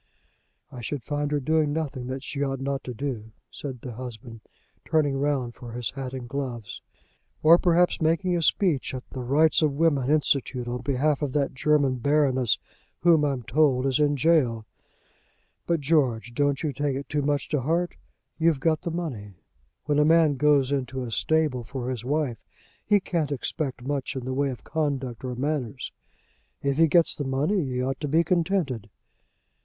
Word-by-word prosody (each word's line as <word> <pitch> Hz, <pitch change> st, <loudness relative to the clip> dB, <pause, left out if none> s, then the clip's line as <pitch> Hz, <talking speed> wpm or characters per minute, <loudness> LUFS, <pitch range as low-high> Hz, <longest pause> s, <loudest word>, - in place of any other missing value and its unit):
"I 125 Hz, -, -8 dB
should 130 Hz, +2 st, -4 dB
find 145 Hz, +2 st, -2 dB
her 145 Hz, 0 st, 0 dB
doing 155 Hz, +2 st, +1 dB
nothing 145 Hz, -5 st, -3 dB
that 130 Hz, +1 st, -5 dB
she 140 Hz, -, -4 dB
ought 135 Hz, -2 st, -1 dB
not 135 Hz, 0 st, -2 dB
to 125 Hz, -, -5 dB
do," 110 Hz, -4 st, -5 dB, 0.2 s
said 130 Hz, -5 st, -7 dB
the 125 Hz, -, -6 dB
husband, 115 Hz, -1 st, -9 dB, 0.4 s
turning 150 Hz, -4 st, +1 dB
round 135 Hz, -3 st, 0 dB
for 120 Hz, -1 st, -10 dB
his 120 Hz, -1 st, -3 dB
hat 135 Hz, -1 st, -5 dB
and 125 Hz, -2 st, -6 dB
gloves. 120 Hz, -5 st, -5 dB, 0.6 s
"Or 165 Hz, +2 st, +8 dB
perhaps 175 Hz, 0 st, +3 dB
making 170 Hz, +3 st, +2 dB
a 170 Hz, -, 0 dB
speech 160 Hz, -5 st, +1 dB
at 130 Hz, -, -7 dB
the 130 Hz, -, -5 dB
Rights 150 Hz, +7 st, +3 dB
of 150 Hz, -3 st, +2 dB
Women 145 Hz, -4 st, +2 dB
Institute 140 Hz, -4 st, +1 dB
on 120 Hz, 0 st, -3 dB
behalf 140 Hz, +3 st, +1 dB
of 140 Hz, -3 st, -2 dB
that 140 Hz, -2 st, 0 dB
German 140 Hz, -1 st, +2 dB
baroness 130 Hz, -3 st, +2 dB, 0.4 s
who, 170 Hz, -3 st, +5 dB
I'm 135 Hz, -4 st, -1 dB
told, 130 Hz, +1 st, +2 dB
is 135 Hz, +2 st, +1 dB
in 145 Hz, -1 st, +3 dB
gaol. 135 Hz, -7 st, +2 dB, 1.0 s
But, 170 Hz, -3 st, +1 dB
George, 135 Hz, -6 st, +1 dB
don't 145 Hz, +2 st, +1 dB
you 150 Hz, -3 st, -1 dB
take 145 Hz, 0 st, -1 dB
it 140 Hz, +1 st, -5 dB
too 150 Hz, -1 st, -1 dB
much 145 Hz, 0 st, 0 dB
to 150 Hz, -3 st, 0 dB
heart. 170 Hz, +6 st, 0 dB, 0.4 s
You've 160 Hz, -3 st, +3 dB
got 155 Hz, +2 st, +1 dB
the -, -, -3 dB
money. 130 Hz, -, -5 dB, 0.5 s
When 145 Hz, 0 st, +2 dB
a -, -, +6 dB
man 160 Hz, -1 st, +5 dB
goes 140 Hz, -1 st, +3 dB
into 130 Hz, -1 st, -2 dB
a 120 Hz, -, -6 dB
stable 150 Hz, -1 st, +1 dB
for 130 Hz, +1 st, -4 dB
his 120 Hz, -3 st, -5 dB
wife, 140 Hz, -3 st, -1 dB, 0.4 s
he 205 Hz, -1 st, +4 dB
can't 165 Hz, -6 st, -2 dB
expect 140 Hz, -1 st, -3 dB
much 140 Hz, -1 st, -2 dB
in 130 Hz, -2 st, -4 dB
the 130 Hz, -, -2 dB
way 140 Hz, +1 st, +1 dB
of 125 Hz, -, -7 dB
conduct 135 Hz, -7 st, -2 dB
or 125 Hz, -1 st, -3 dB
manners. 135 Hz, -2 st, -3 dB, 0.7 s
If 140 Hz, +1 st, 0 dB
he 165 Hz, -, +6 dB
gets 165 Hz, +2 st, +4 dB
the 145 Hz, -, -4 dB
money 145 Hz, +8 st, 0 dB
he 125 Hz, -1 st, -2 dB
ought 135 Hz, +1 st, -2 dB
to 150 Hz, -, -1 dB
be 160 Hz, +4 st, +3 dB
contented." 165 Hz, -, 0 dB
140 Hz, 180 wpm, -26 LUFS, 130-155 Hz, 1.0 s, Or